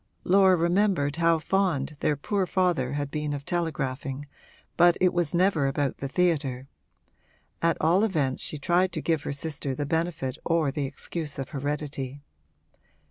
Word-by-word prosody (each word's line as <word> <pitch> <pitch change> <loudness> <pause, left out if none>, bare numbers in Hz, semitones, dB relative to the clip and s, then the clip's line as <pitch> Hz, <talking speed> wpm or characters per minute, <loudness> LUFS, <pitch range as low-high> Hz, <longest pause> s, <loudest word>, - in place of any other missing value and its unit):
Laura 190 0 +5
remembered 170 -4 +1
how 165 -1 +4
fond 160 -4 0
their 150 - +1
poor 190 +6 -1
father 175 -9 +1
had 145 -1 -3
been 150 -1 -2
of 140 -1 -5
telegraphing, 140 -5 -2 0.5
but 175 0 +5
it 185 -1 +3
was 175 -2 0
never 170 -6 +3
about 140 0 -1
the 135 - -3
theatre: 140 -5 0 0.9
at 165 0 +2
all 175 +6 +3
events 150 -11 0
she 150 - -1
tried 175 +5 +2
to - - -2
give 160 -3 0
her - - -4
sister 140 -2 -3
the 145 - -2
benefit 155 -3 -2
or 165 -4 +1
the 145 -1 -2
excuse 150 +2 -4
of 135 -1 -4
heredity. 145 -2 -4
155 Hz, 155 wpm, -27 LUFS, 140-175 Hz, 0.9 s, Laura